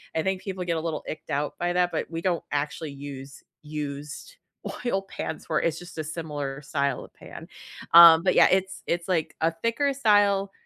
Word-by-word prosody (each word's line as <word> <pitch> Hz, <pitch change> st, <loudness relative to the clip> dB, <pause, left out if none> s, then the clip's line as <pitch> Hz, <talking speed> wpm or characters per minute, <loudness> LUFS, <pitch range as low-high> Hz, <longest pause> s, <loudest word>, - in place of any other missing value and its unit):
I 160 Hz, -, +1 dB
think 190 Hz, +1 st, -1 dB
people 190 Hz, -2 st, -4 dB
get 170 Hz, -1 st, -1 dB
a -, -, -2 dB
little 160 Hz, -2 st, -3 dB
icked 155 Hz, -, -7 dB
out 145 Hz, +1 st, -2 dB
by 175 Hz, 0 st, -1 dB
that, 180 Hz, 0 st, +2 dB
but -, -, -3 dB
we 165 Hz, 0 st, -4 dB
don't 175 Hz, -2 st, 0 dB
actually 145 Hz, +1 st, -3 dB
use 140 Hz, -1 st, -9 dB, 0.2 s
used 150 Hz, -, -6 dB, 0.5 s
oil 195 Hz, -5 st, +1 dB
pans 195 Hz, -, -6 dB
for 155 Hz, -, 0 dB
it's 165 Hz, -1 st, -1 dB
just 175 Hz, -1 st, -12 dB
a 155 Hz, -, -2 dB
similar 150 Hz, -3 st, -5 dB
style 140 Hz, -2 st, -2 dB
of -, -, -20 dB
pan. -, -, -11 dB, 0.5 s
Um, 165 Hz, -1 st, +10 dB
but, 185 Hz, -, +2 dB
yeah, -, -, +7 dB
it's 190 Hz, 0 st, 0 dB
it's, 170 Hz, 0 st, -1 dB
like, 170 Hz, -4 st, -1 dB
a 165 Hz, +1 st, +3 dB
thicker 255 Hz, +5 st, +1 dB
style 205 Hz, -6 st, +3 dB
165 Hz, 195 wpm, -26 LUFS, 150-190 Hz, 0.5 s, Um